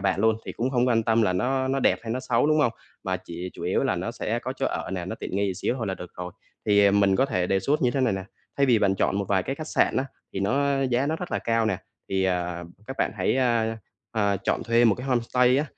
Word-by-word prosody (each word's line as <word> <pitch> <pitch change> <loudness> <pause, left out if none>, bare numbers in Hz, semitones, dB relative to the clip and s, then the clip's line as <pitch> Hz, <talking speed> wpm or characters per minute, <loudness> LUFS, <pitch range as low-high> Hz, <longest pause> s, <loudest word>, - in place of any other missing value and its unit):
bạn 95 0 +1
luôn 110 +1 +3
thì - - -4
cũng 125 +3 -1
hông 125 -1 +2
quan 115 -2 +3
tâm 115 0 +3
là 105 - +2
nó 130 +8 0
nó 135 +1 0
đẹp - - +3
hay 115 -1 -3
nó 130 - -2
xấu, 120 +1 +1
đúng 155 0 +3
hông? 120 -6 +2 0.3
Mà 95 -2 0
chỉ 90 0 -7
chủ - - -10
yếu - - +1
là - - +1
nó - - -3
sẽ - - -2
có - - -4
chỗ - - 0
ở - - -3
nè, 90 -2 -3
nó 95 - -4
tiện 95 - -5
nghi 100 -2 0
xíu 120 - -1
thôi 115 -5 -3
là 95 - -1
được 90 -1 -9
rồi. 90 0 -5 0.3
Thì 100 -1 +5
mình 100 -1 +3
có 135 - +4
thể 90 -8 0
đề 95 +1 +1
xuất 145 +10 +1
như 125 - +3
thế 135 - -1
này 125 -5 +2
nè, 95 -1 -3 0.3
thay 140 - +3
vì 120 -4 +4
bạn 100 -2 +2
chọn 95 - +1
một 100 - -1
vài 95 -2 +2
cái 135 - -3
khách 155 +2 -7
sạn - - +2
á, 130 - +1 0.3
thì 95 - -3
nó 135 +6 +1
giá 130 +1 +1
nó 155 +2 0
rất 180 +1 -6
là - - +1
cao 115 -1 +1
nè, 105 -4 +1 0.3
thì, 95 0 +1
ờ, 90 -1 -1 0.2
các 135 - -6
bạn - - +1
hãy, 95 +6 +1
ờ, 115 -3 +1 0.3
ờ, 100 -3 +1
chọn - - 0
thuê 115 +1 +3
một 110 -4 +5
cái 125 +5 -7
homestay 125 0 +3
á. 145 - +1
115 Hz, 290 wpm, -25 LUFS, 95-130 Hz, 0.3 s, Thì